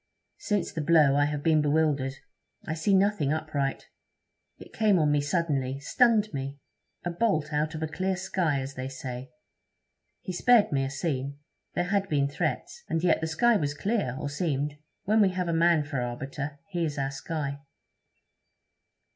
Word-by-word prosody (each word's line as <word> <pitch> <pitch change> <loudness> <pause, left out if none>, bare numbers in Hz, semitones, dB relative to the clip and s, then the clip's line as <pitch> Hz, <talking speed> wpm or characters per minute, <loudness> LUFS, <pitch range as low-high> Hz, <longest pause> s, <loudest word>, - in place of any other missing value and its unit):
'Since 205 -2 -1
the 160 - -2
blow 150 -3 +5
I 145 0 +4
have 145 -1 -3
been 155 -2 +4
bewildered; 145 -3 +1 0.5
I 160 - -2
see 165 +5 +2
nothing 190 -7 +2
upright. 155 -3 -2 0.7
It - - -14
came 215 -3 +3
on 150 -3 +3
me 145 -1 +3
suddenly; 145 -4 -1
stunned 215 - +3
me. 140 0 -4 0.5
A 175 - -1
bolt 170 -6 0
out 150 +2 0
of 160 - -4
a - - 0
clear 185 +4 -1
sky, 180 -6 0
as 135 +1 -6
they 130 0 -5
say. 130 -1 -6 0.9
He 185 - -5
spared 235 +4 +4
me 135 -2 +1
a 135 - -2
scene: 140 -1 -3 0.4
There 175 - +1
had 200 -1 +1
been 140 -2 +2
threats, 145 - -3
and 165 +1 -1
yet 180 - +3
the 160 - -1
sky 225 +8 +3
was 145 -5 -2
clear, 195 - -1
or 145 - -3
seemed. 145 -1 -2 0.2
When 215 +2 +3
we 200 - +5
have 180 -1 -2
a 170 - 0
man 165 -1 +4
for 145 -3 -3
arbiter, 135 +4 -4
he 175 -2 -1
is 150 -2 -2
our 135 -1 -1
sky.' 140 0 -4
155 Hz, 175 wpm, -28 LUFS, 140-180 Hz, 0.9 s, blow